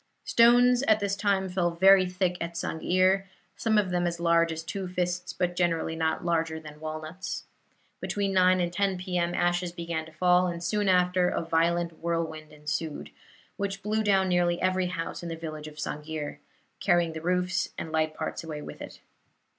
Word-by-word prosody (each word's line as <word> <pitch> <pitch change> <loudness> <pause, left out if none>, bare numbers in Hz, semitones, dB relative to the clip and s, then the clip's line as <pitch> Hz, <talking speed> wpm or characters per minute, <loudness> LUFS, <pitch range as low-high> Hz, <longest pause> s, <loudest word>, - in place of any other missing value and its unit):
Stones 245 +1 +5
at 215 -1 +5
this 200 -1 -1
time 200 -2 +1
fell 180 -1 0
very 190 +2 +5
thick 180 0 0
at 170 0 -4
Sang'ir 185 +4 +1 0.3
some 220 -1 +1
of 195 -3 +2
them 175 -1 +1
as 170 0 -3
large 170 -1 +3
as 160 0 -5
two 190 +3 -4
fists, 180 0 -2
but 175 -1 -2
generally 165 -2 0
not 160 +2 -1
larger 165 -2 0
than 150 -1 -12
walnuts. 155 +4 -5 0.6
Between 200 -1 -1
9 185 0 +4
and 175 -1 -1
10 195 0 +1
P. 180 0 -2
M. 170 0 0
ashes 175 0 +1
began 170 -2 -4
to - - -13
fall, 180 +2 +3
and 170 -1 -4
soon 205 +2 0
after 180 0 +3
a - - -2
violent 170 0 0
whirlwind 160 -2 -3
ensued, 150 +1 -4 0.5
which 195 0 -3
blew 215 +1 0
down 195 -2 +3
nearly 175 -1 +2
every 185 0 +1
house 175 -2 -4
in 170 - -6
the 165 - -4
village 155 -2 -7
of 150 - -11
Sang'ir 150 0 -5 0.4
carrying 170 -2 +2
the 160 - -6
roofs 180 +2 0
and 160 - -5
light 155 -1 0
parts - - -4
away 150 -2 -6
with - - -9
it. - - -9
175 Hz, 185 wpm, -28 LUFS, 165-185 Hz, 0.6 s, Stones